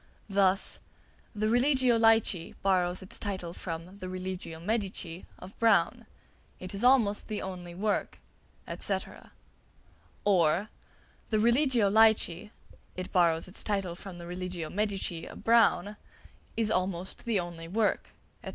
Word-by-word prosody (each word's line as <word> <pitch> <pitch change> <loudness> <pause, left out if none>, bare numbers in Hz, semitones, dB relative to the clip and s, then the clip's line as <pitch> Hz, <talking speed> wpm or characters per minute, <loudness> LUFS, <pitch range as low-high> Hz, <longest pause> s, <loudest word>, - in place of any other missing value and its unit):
Thus: 195 0 +2 0.6
"The 215 +1 0
'Religio 250 +1 +3
Laici' 225 -6 +3
borrows 185 -1 +2
its 190 - -9
title 185 -5 -4
from 175 +3 -7
the 185 - -6
'Religio 185 -3 -5
Medici' 190 -3 -3
of 190 +2 -11
Browne. 230 -1 +3 0.5
It 185 +2 -7
is 200 +3 -2
almost 240 -5 +4
the 215 -2 -3
only 180 -2 -7
work," 205 +3 -1 0.6
&c. - - 0 1.3
or, 185 0 +3 0.6
"The 215 - +2
'Religio 235 -1 +3
Laici' 210 -4 +3 0.5
(it 185 +1 -5
borrows 170 -3 +3
its 185 - -6
title 195 -4 -1
from 185 +1 -9
the 170 - -9
'Religio 180 -2 -5
Medici' 195 -5 -2
of - - -11
Browne) 220 -3 +3 0.6
is 225 -2 +2
almost 185 +2 -2
the 225 -4 +1
only 170 -2 -6
work," 210 +4 0 0.3
&c. - - -5
195 Hz, 130 wpm, -29 LUFS, 180-215 Hz, 1.3 s, almost